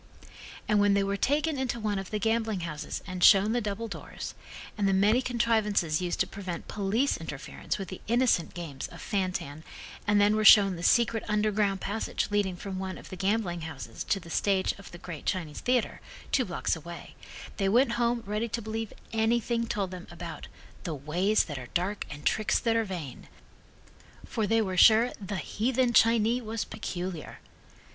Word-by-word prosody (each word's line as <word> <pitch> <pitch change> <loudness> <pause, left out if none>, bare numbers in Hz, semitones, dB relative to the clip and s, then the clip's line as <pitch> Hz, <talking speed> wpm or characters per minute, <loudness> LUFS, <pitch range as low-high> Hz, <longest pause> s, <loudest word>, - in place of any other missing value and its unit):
And 210 -1 +3
when 205 0 +4
they 200 - +3
were 200 0 -1
taken 290 +7 +1
into 250 -3 -2
one 210 -2 -1
of 195 - -7
the 215 - -2
gambling 220 -2 0
houses 155 -3 -5
and 185 -1 -4
shown 200 +1 +7
the 240 +1 +1
double 210 +2 -3
doors, 210 - -7 0.4
and 205 -2 +1
the 195 - +3
many 210 +6 +4
contrivances 220 -9 +1
used 175 -1 -2
to - - +3
prevent 185 -4 -6
police 215 +7 0
interference 150 -4 -5
with 195 -2 -6
the 185 - -8
innocent 235 -8 +2
games 160 -6 -6
of - - -12
fan 190 -3 -1
tan 150 -3 -6 0.4
and 205 0 +4
then 205 +1 +4
were 215 - +1
shown 200 -3 +8
the 170 - -7
secret 230 +3 +3
underground 210 -2 +1
passage 205 0 -2
leading 200 -3 +1
from 190 +1 -6
one 190 -1 -4
of - - -12
the - - -5
gambling 190 -2 0
houses 140 -8 -7
to 195 - +1
the 170 -2 -12
stage 195 0 +1
of 200 - -11
the 175 - -10
great 170 -3 -8
Chinese 165 -6 -2
theatre, 245 -2 0 0.3
two - - +2
blocks - - -1
away, - - -9 0.4
they 195 -2 +1
went 240 +4 +4
home 235 0 0
ready 210 +3 -1
to 235 - -3
believe 220 0 -4 0.2
anything 230 +1 +1
told 195 -4 -2
them 180 -1 -8
about - - -8 0.4
"the 165 -4 -3
ways 175 +9 +1
that 145 -5 -6
are 125 - -9
dark 185 +4 -1
and 145 +1 -9
tricks 215 - +2
that 230 -1 +1
are 225 - +3
vain," 170 -10 -7 1.0
for 220 -2 -2
they 225 +1 +3
were 190 -2 -3
sure 225 +6 +6
"the 195 +1 -3
heathen 240 +7 0
Chinee 230 +2 +4
was 225 -1 -3
peculiar." 180 -6 -5
205 Hz, 185 wpm, -28 LUFS, 185-225 Hz, 1.0 s, shown